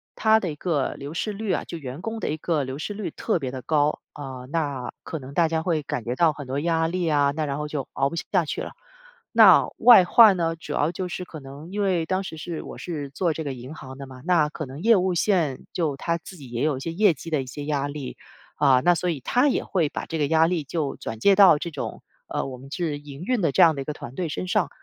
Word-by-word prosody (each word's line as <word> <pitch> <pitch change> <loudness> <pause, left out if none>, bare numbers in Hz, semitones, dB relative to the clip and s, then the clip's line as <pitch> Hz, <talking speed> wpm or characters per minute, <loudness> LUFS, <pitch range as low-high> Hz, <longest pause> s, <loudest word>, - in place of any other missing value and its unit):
它 220 0 +4
的 175 -5 -2
一 - - -7
个 150 -4 -1
流 140 +2 -7
失 210 +5 -2
率 205 -1 -2
啊， - - -1
就 170 - -6
员 140 +1 -7
工 225 0 -4
的 - - -3
一 150 - -1
个 155 -2 0
流 130 +1 -5
失 205 - -4
率 205 -2 -5
特 215 -7 -1
别 130 - -3
地 130 - -6
高。 150 +1 +1 0.2
嗯， 130 -2 -7
那 145 -6 -2
可 160 - -5
能 135 0 -10
大 170 +2 +3
家 160 0 -1
会 165 -4 0
感 125 -4 -4
觉 120 +1 -3
到 165 -1 +3
很 145 -2 -9
多 135 +2 -2
压 165 0 +1
力 180 0 -1
啊， 145 -2 +3
那 155 -1 -1
然 140 -1 -3
后 150 - -3
就 145 -3 -4
熬 135 +1 +1
不 170 - -6
下 180 +1 0
去 - - -3
了。 - - -6 0.7
那 - - +8
外 230 -7 +8
患 210 -1 +7
呢， 165 -1 0
主 160 -2 -9
要 150 +3 +1
就 185 +1 -3
是 180 - -5
可 160 - -9
能 140 +4 -10
因 205 +1 -2
为 180 -4 +1
当 185 +3 -1
时 160 -4 -7
是 165 +1 -5
我 - - -9
是 150 -5 -5
做 165 +3 0
这 160 - -4
个 140 -3 -3
银 130 +4 -9
行 130 -3 -10
的 140 0 -8
嘛， 130 -1 -12
那 170 -4 +3
可 155 0 -6
能 135 +5 -9
业 230 +1 +5
务 185 -1 +1
线 170 -7 +1
就 155 -6 -1
它 170 +3 -1
自 175 +2 -12
己 135 -4 -11
也 120 +2 -2
有 150 -3 +1
一 - - -6
些 165 - -4
业 200 0 +4
绩 160 +3 -9
的 155 -4 +1
一 - - -11
些 145 +3 -7
压 145 -2 -1
力。 145 -3 -6 0.5
嗯， 130 -3 +5
那 175 0 +5
所 180 +2 -1
以 155 - -2
它 250 - +2
也 - - 0
会 170 -6 0
把 - - -5
这 165 - -4
个 145 - +2
压 160 +1 +4
力 170 -3 -1
就 145 0 -3
转 110 0 -6
借 195 - +5
到 190 -5 +7
这 170 - -4
种 - - -5 0.3
呃， - - -2
我 130 -2 -6
们 135 +2 -13
是 155 -3 -2
营 145 +2 -10
运 250 +1 0
的 165 -5 +2
这 - - +3
样 160 -2 +5
的 140 - -4
一 - - -6
个 150 - -3
团 130 -2 -9
队 175 -3 -2
身 185 - -4
上。 180 - +1
155 Hz, 300 characters per minute, -24 LUFS, 140-175 Hz, 0.7 s, 那